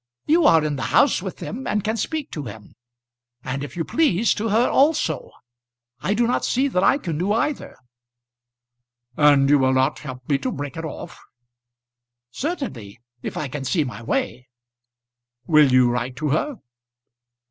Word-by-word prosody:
You 325 +1 +3
are 160 -2 +5
in 150 -2 -2
the - - -5 0.2
house - - +4
with - - -6
them, 255 +5 -6
and 210 -1 0
can 220 +2 -1
speak 300 +6 -3
to 150 -3 -5
him, 105 -2 -10 0.7
and 135 +2 -4
if 145 - -8
you 165 - -1
please 235 - +2
to 220 +2 -3
her 225 +4 +3
also. 275 - +1 0.7
I 200 +9 -1
do 235 +2 +2
not 240 - 0
see 265 +3 +1
that 185 -7 0
I 275 - +4
can 165 - -4
do 190 +4 0
either." 255 +6 -2 1.4
"And 145 -2 +5
you 145 0 +5
will 130 0 +2
not 130 +2 +1
help 130 -3 -9
me 140 -2 +1
to - - -2
break 145 +2 -6
it 165 0 -5
off?" 155 - -8 1.1
"Certainly, 135 - -5 0.2
if - - -5
I 150 - -2
can 135 +1 -6
see 150 +5 +1
my 125 -4 -7
way." 125 +2 -3 1.0
"Will 150 -3 +5
you 125 -1 +5
write 125 +1 -3
to 150 +2 -2
her?" 210 - 0
155 Hz, 170 wpm, -22 LUFS, -, 1.4 s, are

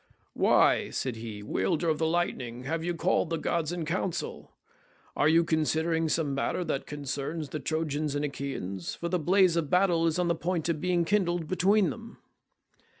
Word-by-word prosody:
"Why," - - +3
said 130 -3 -3
he, 110 -2 -7
"wielder 105 - 0
of 155 -2 +1
the 160 - +2
lightning, 130 -8 -2
have 160 +4 -2
you 175 0 -1
called 165 0 +1
the 165 - -1
gods 165 0 -1
in 175 -2 -3
council? 175 +2 -3 0.6
Are 150 - +3
you 165 +1 +5
considering 160 0 +1
some 150 -3 0
matter 140 +6 -1
that 140 - -3
concerns 145 +2 -4
the 155 - -4
Trojans 155 -2 -2
and 145 +1 0
Achaeans—for 135 - -4
the 180 0 0
blaze 185 +1 +4
of 165 -4 0
battle 180 -3 +3
is 160 - 0
on 180 -1 +1
the 170 - +3
point 170 0 -2
of 160 -3 -1
being 180 -2 +1
kindled 175 -4 +1
between 190 +2 +3
them?" 230 0 -10
160 Hz, 175 wpm, -28 LUFS, 145-175 Hz, 0.6 s, you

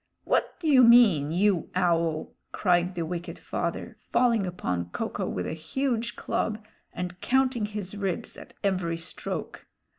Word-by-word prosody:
"What - - 0
do 335 - -3
you 265 -4 +7
mean, 220 -12 +6
you 185 0 +2
Owl?" 170 -3 +1 0.2
cried 180 -1 +1
the 170 -2 -2
wicked 175 +1 -5
father, - - -4
falling 230 -6 +2
upon 90 - -2
Ko - - -3
ko - - -3
with 90 - -3
a - - -3
huge 235 - -2
club, 215 -1 -1 0.3
and 180 0 -6
counting 255 -4 +2
his 205 -2 -6
ribs 195 -4 -3
at - - -12
every 180 -4 0
stroke. 165 - -6
185 Hz, 150 wpm, -27 LUFS, 170-230 Hz, 0.3 s, you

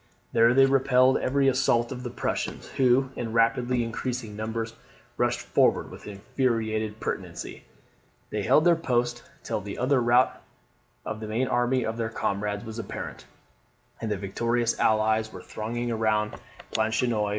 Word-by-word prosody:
There 115 +1 +5
they 135 0 +7
repelled 130 -1 +4
every 135 +1 +2
assault 125 -2 +2
of 125 -1 -5
the 125 - -4
Prussians, 120 - -3
who 130 0 +2
in 115 -2 -4
rapidly 120 +2 +2
increasing 115 -1 -4
numbers 110 +1 -3 0.4
rushed - - 0
forward - - +2
with - - -11
infuriated 110 0 -1
pertinacity. - - -5 0.7
They 105 - -1
held 150 +10 +4
their 175 -1 +6
post 120 -6 0 0.2
till - - -2
the 100 +1 -7
utter 130 +1 +2
rout 120 +2 +3 0.6
of 110 0 -4
the 110 - -6
main 115 +5 0
army 120 0 +1
of 110 +1 -3
their 115 -1 -1
comrades 105 -1 -2
was 110 +1 -6
apparent, - - -7 0.7
and 110 - -2
the 105 - -1
victorious 115 +5 -1
Allies 110 0 +2
were - - -10
thronging 120 +2 -4
around 110 -1 +1 0.4
Planchenoit. 110 -1 +1
115 Hz, 150 wpm, -26 LUFS, 110-125 Hz, 0.7 s, they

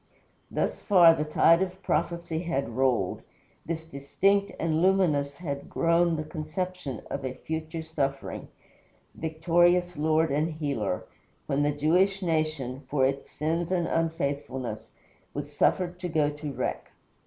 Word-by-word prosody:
Thus - - -1
far 175 -5 +7
the 150 - -1
tide 165 +3 +4
of 190 0 -3
prophecy 170 -2 -1
had 165 -7 -2
rolled; 120 -5 +1 0.5
thus 160 -1 -3
distinct 195 +8 +1
and 160 -1 +1
luminous 160 -7 +2
had 140 -5 -5
grown 170 0 +2
the 155 - -2
conception 155 - -4
of - - -3
a 130 -1 -3
future 160 +3 -5
suffering, 140 -4 -3 0.7
victorious 175 +2 +2
Lord 155 +1 +2
and 155 +2 -1
leader, 115 - -1 0.4
when 140 +1 0
the 145 0 +2
Jewish 180 +7 +2
nation, 155 -6 -1
for 135 -3 +2
its 135 +1 -2
sins 165 +3 -2
and 175 -2 +1
unfaithfulness, 140 -9 -2 0.4
was - - -5
suffered 180 -1 +1
to 180 -1 -3
go 155 -2 +2
to 150 0 -6
wreck. 130 -1 -4
160 Hz, 135 wpm, -27 LUFS, 140-175 Hz, 0.7 s, far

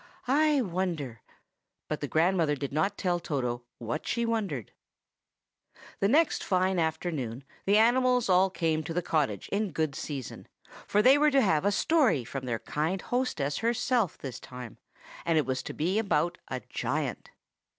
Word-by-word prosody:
I 295 +1 +3
wonder—" 170 - -3 0.7
But 155 - -3
the 145 - -2
grandmother 165 -1 +2
did 140 -1 -5
not 190 +7 0
tell 175 -2 0
Toto 125 -7 -3
what 120 +7 -4
she 235 -1 0
wondered. 200 - -2 1.3
The 195 - +3
next 310 +9 +3
fine 185 -1 +1
afternoon, 155 -6 -2 0.2
the 200 +1 +5
animals 250 +2 +4
all 185 +1 +4
came 165 -3 0
to 165 - -5
the 180 - 0
cottage 140 - 0
in 205 0 0
good 155 -2 -1
season, 135 -3 -6 0.4
for 210 +1 +3
they 270 +3 +7
were 300 0 +5
to 275 -2 +4
have 160 -4 +2
a 205 - +4
story 250 - +2
from 135 +2 -5
their 115 -2 0
kind 160 +10 -2
hostess 180 - -1
herself 235 - +1
this 130 -3 -7
time, 125 -2 -10 0.4
and 165 -1 +2
it 150 - +2
was 130 0 -1
to - - -6
be 180 +7 0
about 175 -4 0
a 130 -1 -4
giant. - - -3
170 Hz, 160 wpm, -29 LUFS, 145-210 Hz, 1.3 s, they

